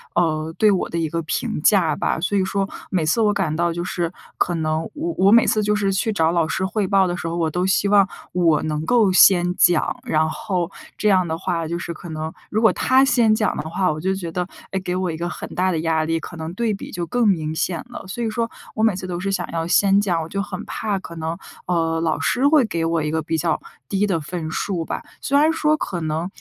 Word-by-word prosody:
呃， 160 -2 0
对 215 - +5
我 190 - 0
的 170 - -3
一 165 - 0
个 165 +2 -2
评 160 -1 -2
价 185 -2 +4
吧， - - -1
所 195 +4 0
以 190 - +2
说 195 +1 -1 0.2
每 175 -4 0
次 160 +9 +2
我 210 -1 +3
感 155 -6 -1
到 170 +1 +1
就 170 +1 -3
是 175 -1 -2 0.3
可 175 - +1
能 155 -1 0
我 330 +3 -3
我 195 +2 +5
每 235 0 +7
次 215 - +2
就 210 +1 +2
是 200 -2 +1
去 220 +4 0
找 165 -5 +2
老 170 -2 +2
师 190 +4 -1
汇 205 +1 -1
报 190 0 +3
的 175 - -2
时 170 - -5
候， 170 +1 -3
我 165 -2 +1
都 180 +4 -1
希 190 +1 +2
望 200 -1 +4 0.2
我 165 -4 +3
能 155 0 -2
够 230 -3 +4
先 180 -1 +6
讲。 175 -3 +3
然 155 0 +1
后 180 +1 -2 0.3
这 215 - 0
样 185 -2 +4
的 160 -1 -3
话 170 -2 -2
就 170 +2 -3
是 170 - -5
可 170 +1 -10
能 155 0 -5 0.2
如 215 - 0
果 225 - +5
他 260 +1 +4
先 235 -5 +4
讲 215 0 +1
的 155 - -4
话， 185 +2 +1
我 155 0 -5
就 190 +3 0
觉 185 -3 -4
得， 180 +1 -2 0.3
哎， 190 - -1
给 180 - -2
我 185 -1 -1
一 160 - -3
个 170 +2 -3
很 - - -6
大 185 +1 +1
的 165 - -1
压 160 -1 +1
力， 165 +1 0
可 170 - -9
能 160 +1 -6
对 230 0 0
比 200 - -7
就 175 -1 -3
更 245 +4 +1
明 160 -5 0
显 170 +1 -1
了。 - - -8
所 190 +6 -5
以 230 - 0
说 230 +1 -2 0.2
我 220 - -1
每 220 -2 +4
次 185 - -6
都 175 -1 -3
是 195 +2 -2
想 180 -2 -2
要 165 -1 -1
先 195 +3 +4
讲， 175 -5 0
我 160 - -5
就 200 +4 -3
很 200 +1 -6
怕 210 -2 -2
可 170 - -9
能， 160 +1 -3 0.3
呃， 165 -2 0
老 160 -1 0
师 260 +3 +2
会 290 -4 +5
给 170 -6 -2
我 165 -1 0
一 150 - -1
个 160 0 0
比 160 +1 -2
较 - - 0 0.3
低 200 +1 +1
的 185 -5 0
分 160 +1 -5
数 175 +1 -2
吧。 - - -4 0.2
虽 280 0 +1
然 310 +2 +4
说 310 -1 +2
可 175 - -4
能， 160 +2 -2
180 Hz, 280 characters per minute, -21 LUFS, 165-200 Hz, 0.3 s, 每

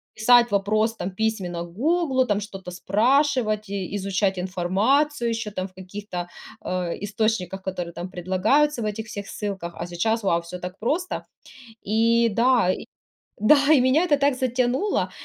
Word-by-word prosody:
писать 240 +2 +5
вопрос, 215 +3 +1
там, 190 -2 -4
письменно 185 -5 -2
"Гуглу", 260 - +1
там 205 -2 0
что-то 195 -3 -8
спрашивать 215 +1 +1
и 200 -1 -4
изучать 195 0 0
информацию 225 +10 +1
еще 225 -2 -3
там 185 -1 -4
в 185 - -23
каких-то, 185 -1 -7 0.3
э, 180 -2 -2
источниках, 205 -3 -1
которые 180 -3 -5
там 175 +2 -6
предлагаются 205 - +1
в - - -2
этих 215 +1 -3
всех 205 -2 -7
ссылках. 195 -5 -5
А 170 - -5
сейчас- 220 +6 -1
вау!- 170 -3 +2
Всё 170 +2 -8
так 180 +1 -7
просто. 320 - -2 0.6
И 230 +2 +3
да, 230 -3 +3
и - - -6 0.5
Да! 215 +8 +6 0.2
И 265 - +5
меня 275 +7 +3
это 290 -4 +3
так 280 -1 +2
затянуло, 255 - 0
210 Hz, 155 wpm, -24 LUFS, 185-245 Hz, 0.6 s, Да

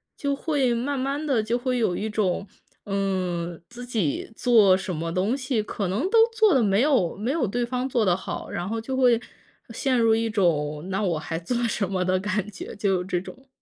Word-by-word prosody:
就 280 -1 -1
会 275 -4 0
慢 265 +3 -2
慢 280 +3 -2
地 265 -7 +2
就 230 +3 0
会 250 0 -1
有 190 -6 +1
一 215 - -2
种， 200 -2 -1 0.4
嗯， 185 -4 -2
自 245 +1 -9
己 220 - -2
做 220 -7 +5
什 185 -2 -4
么 165 +2 -3
东 190 +8 0
西 255 -4 -1
可 205 -2 -3
能 195 +6 -1
都 460 - +3 0.2
做 440 -5 +4
得 260 - +4
没 200 +2 +3
有 260 - +2
没 225 +6 -1
有 300 -5 +1
对 240 +5 -1
方 250 +1 -2
做 240 -4 +1
得 180 -2 +3
好， - - -6
然 175 +1 -3
后 225 +1 -2
就 260 +3 -4
会 245 -3 +4 0.5
陷 260 +2 0
入 225 -1 +4
一 225 0 0
种 155 -5 0
那 195 +2 0
我 175 -4 0
还 165 +1 -4
做 175 +9 -3
什 205 -3 -1
么 185 -1 0
的 185 0 +2
感 205 +1 -2
觉， 190 - -8
就 200 -1 0
有 180 - 0
这 180 -1 -1
种。 265 +8 -12
215 Hz, 235 characters per minute, -25 LUFS, 185-250 Hz, 0.5 s, 做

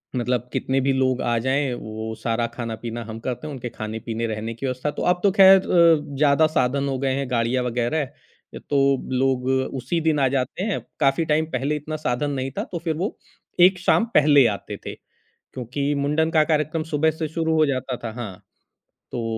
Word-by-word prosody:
मतलब 125 0 -1
कितने 135 +1 0
भी 135 +1 +2
लोग 130 -1 +1
आ 120 -1 0
जाएँ, 135 0 +1
वो 110 -1 -6
सारा 115 0 0
खाना-पीना 115 0 -5
हम 110 0 -8
करते 125 +5 -5
हैं, 150 - -6
उनके 125 -2 -6
खाने-पीने, 110 +1 -4
रहने 110 +1 -4
की 115 +4 -6
व्यवस्था। 130 +2 -2
तो - - -2
अब 180 - -1
तो 200 - +4
खैर 195 0 +9
अ, 165 -6 +3
ज़्यादा 150 +2 +4
साधन 140 +3 +1
हो 135 -1 -1
गए 135 0 0
हैं 135 -2 -3
गाड़ियाँ 120 +1 +1
वग़ैरह 125 +5 0
अ, - - -17
तो 145 - +1 0.5
लोग 130 -1 +1 0.3
उसी 140 +8 -1
दिन 155 -2 +3
आ 135 - +3
जाते 135 +7 -2
हैं। 210 -1 -1 0.2
काफ़ी 135 +4 +2
टाइम 155 +1 +3
पहले 140 +4 0
इतना 150 +1 -5
साधन 145 +4 -1
नहीं 135 -1 -3
था - - 0
तो 175 - -3
फिर 160 -2 0
वो 190 +6 -3 0.5
एक 185 -1 -2
शाम 205 +5 +3
पहले 145 -3 +6
आते - - -8
थे, - - -5 0.6
क्योंकि 130 +3 -4 0.2
मुंडन 160 +3 +1
का 155 - +6
कार्यक्रम 155 +1 0
सुबह 160 +2 +3
से 160 - -1
शुरू 160 -1 0
हो 155 -1 +4
जाता 130 -2 -2
था। 115 - -3
हाँ, 105 -6 -5 0.8
तो 120 - -3
135 Hz, 200 wpm, -23 LUFS, 120-155 Hz, 0.8 s, खैर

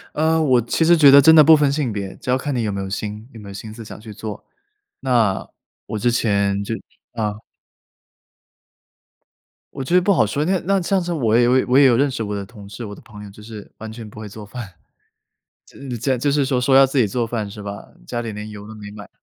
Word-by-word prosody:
呃， 160 +1 +2
我 130 -5 +3
其 120 +8 0
实 170 +1 +5
觉 145 -3 +7
得 140 +1 +9
真 160 +3 +7
的 155 - +9
不 160 +1 +8
分 145 -2 +2
性 140 -6 -1
别， 100 -2 -5
只 - - -9
要 125 - +3
看 145 +2 -3
你 120 -2 -1
有 105 - -1
没 100 - -4
有 95 - -5
心 105 +3 -5
有 115 - -11
没 100 -2 -11
有 - - -9
心 105 +2 -8
思 115 -1 -10
想 - - -10
去 110 -1 -10
做。 105 0 -7 0.6
那 115 -7 +1 0.4
我 110 - -5
之 120 +3 +1
前 100 -4 +1
就 115 +3 -3 0.4
啊。 105 -2 -3 2.3
我 135 - -6
觉 170 +7 0
得 180 - +6
不 200 +3 +2
好 135 - +3
说， 140 +8 -2
那 185 +3 +1
那 195 +1 +2
这 175 - -3
样 190 - +3
子 175 0 -3
我 115 -8 +1
也 120 - +4
有 125 +2 +4
也 - - +1
我 130 +2 +4
也 140 - +7
有 120 -3 +5
认 140 +2 +2
识 115 - -4
我 105 -1 -3
的 100 -1 -5
同 105 -2 -13
事、 110 +4 -8
我 105 - -7
的 - - -13
朋 105 -2 -12
友， 100 - -10
就 100 +2 -15
是 105 -1 -11
完 110 0 -8
全 110 -1 -9
不 105 - -12
会 110 - -7
做 105 +1 -10
饭。 105 -3 -9 0.9
就 - - -18
是 125 -3 -5
这样 130 +3 0
就 140 +4 0
是 140 -1 +1
说 130 -2 0
说 135 +1 +3
要 135 0 +8
自 135 0 -1
己 110 - +3
做 120 +4 -1
饭 110 -3 -3
是 105 +1 -9
吧？ 100 0 -7 0.2
家 120 - -3
里 115 - -5
连 105 +1 -7
油 105 0 -10
都 110 - -10
没 105 -1 -10
买。 105 -2 -11
115 Hz, 285 characters per minute, -20 LUFS, 105-135 Hz, 2.3 s, 得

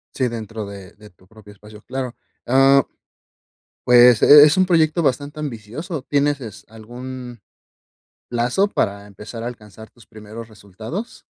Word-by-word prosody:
Sí, 130 - 0
dentro 115 -2 -6
de 100 -2 -11
de 105 0 -17
tu 90 +1 -26
propio 105 -1 -16
espacio, 105 +1 -15
claro. 130 -1 -5 0.3
Ah, 135 +2 +5 1.0
pues 120 -2 +6
e 145 0 +9
es 150 +2 +4
un 185 - +4
proyecto 165 -2 +2
bastante 145 +1 -2
ambicioso, 140 - -6
¿tienes 145 +1 0
es 110 -4 -10
algún 120 +2 -10 0.9
plazo 125 +12 0
para 100 - -3
empezar 105 +3 -10
a - - -4
alcanzar 110 -2 -12
tus 120 - -22
primeros 110 +1 -11
resultados? 110 - -9
120 Hz, 140 wpm, -20 LUFS, 105-140 Hz, 1.0 s, e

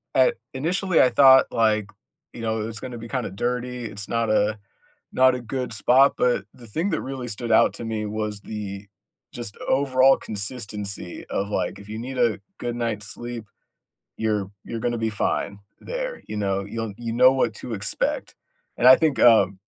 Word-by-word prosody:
uh - - +5 0.2
initially, 175 +6 +1
I 130 - +5
thought, 130 -1 +7
like, 110 -2 +1 0.4
you 120 - -8
know, 110 -1 -1
it - - -3
was 110 -1 -6
gonna 125 0 -7
be, 115 0 -8
kinda, 125 -7 -3
dirty. 125 +3 -3
It's 105 -1 -6
not 115 -1 0
a 105 0 +1 0.5
not 130 0 +5
a 125 - -5
good 125 +1 -4
spot, 130 +6 +4
but 120 -5 +1
the 120 - -14
thing 165 - -2
that 160 - -1
really 130 -2 -5
stood 115 +1 -4
out 110 - +5
to - - -7
me 110 -1 -3
was 105 -1 -3
the 100 -2 -7 0.5
just 115 -4 -6
overall 135 -1 +4
consistency 100 -3 -4
of, 100 - -1
like, - - -2
if 100 0 -13
you 110 - -5
need 130 +3 -6
a 115 -5 +2 0.2
good 120 -1 -3
night's 115 -3 -3
sleep, 120 -1 -6 0.7
you're 105 -3 -1
you're 115 - -5
gonna 120 +1 -1
be 110 0 -1
fine 100 -1 -2 0.2
there, - - -5
you 105 - -6
know, 100 -1 -1
you'll 110 0 -5
you 115 -1 -4
know 125 +2 +6
what 125 -4 +1
to 115 - -6
expect. 105 0 -2 0.4
And 125 - +6
I 130 - +10
think, 155 -6 +1
um, 110 -5 +5
115 Hz, 185 wpm, -24 LUFS, 105-125 Hz, 0.7 s, I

